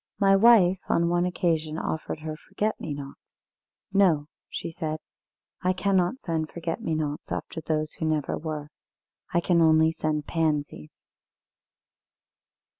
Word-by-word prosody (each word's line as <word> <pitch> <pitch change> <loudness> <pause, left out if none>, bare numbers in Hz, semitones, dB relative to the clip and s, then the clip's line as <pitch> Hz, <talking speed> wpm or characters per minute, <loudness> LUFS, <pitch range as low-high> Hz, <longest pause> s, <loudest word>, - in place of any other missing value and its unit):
My 195 -1 +5
wife 195 -4 +6
on 170 0 +3
one 175 +1 +2
occasion 160 -4 0
offered 160 -1 -3
her 155 0 -4
forget 205 +6 -3
me 155 - -4
nots. 140 -1 -11 0.6
'No,' 165 -7 +3 0.2
she - - -5
said; 160 -2 -3 0.6
'I 185 +1 +2
cannot 190 +3 +1
send 160 - -2
forget 165 -1 -4
me 160 - -1
nots 150 -1 -3
after 160 - -4
those 155 -1 -1
who 160 - -1
never 155 -3 0
were, 155 -2 -5 0.6
I 170 - +2
can 175 -1 +3
send - - +4
only 160 -1 +3
Pansies.'" 150 - -2
160 Hz, 135 wpm, -26 LUFS, 155-180 Hz, 0.6 s, wife